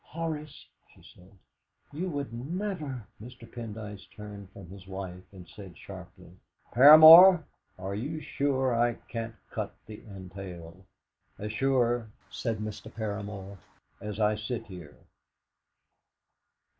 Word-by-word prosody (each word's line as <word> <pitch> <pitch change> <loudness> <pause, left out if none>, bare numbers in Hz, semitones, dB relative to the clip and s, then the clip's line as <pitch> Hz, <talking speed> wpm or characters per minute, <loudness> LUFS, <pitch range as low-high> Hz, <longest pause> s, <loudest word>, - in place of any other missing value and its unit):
"Horace," 155 -2 -6 0.3
she - - -21
said, 90 +1 -18 0.6
"you 180 +5 -3
would 145 -6 -4
never 150 - -4
" - - -22
Mr. 120 -1 -12
Pendyce 110 -3 -8
turned 105 -2 -10
from 95 -2 -12
his 95 +1 -13
wife, 95 -1 -7
and 90 -3 -13
said 95 -1 -12
sharply: 95 -2 -12 0.4
"Paramor, 160 +6 +10 0.3
are 95 +1 -5
you 140 +10 -4
sure 135 -4 -1
I 120 +1 +2
can't 115 -1 -7 0.2
cut - - -4
the 110 -1 -11
entail?" 95 -3 -10 0.5
"As 105 +1 -5
sure," 120 -3 +1 0.2
said 115 -3 -3
Mr. 110 +1 -7
Paramor, 100 -3 -6 0.4
"as 105 0 -6
I 105 0 +3
sit 110 +2 -5
here!" 90 -7 -11
110 Hz, 120 wpm, -28 LUFS, 95-130 Hz, 0.6 s, Paramor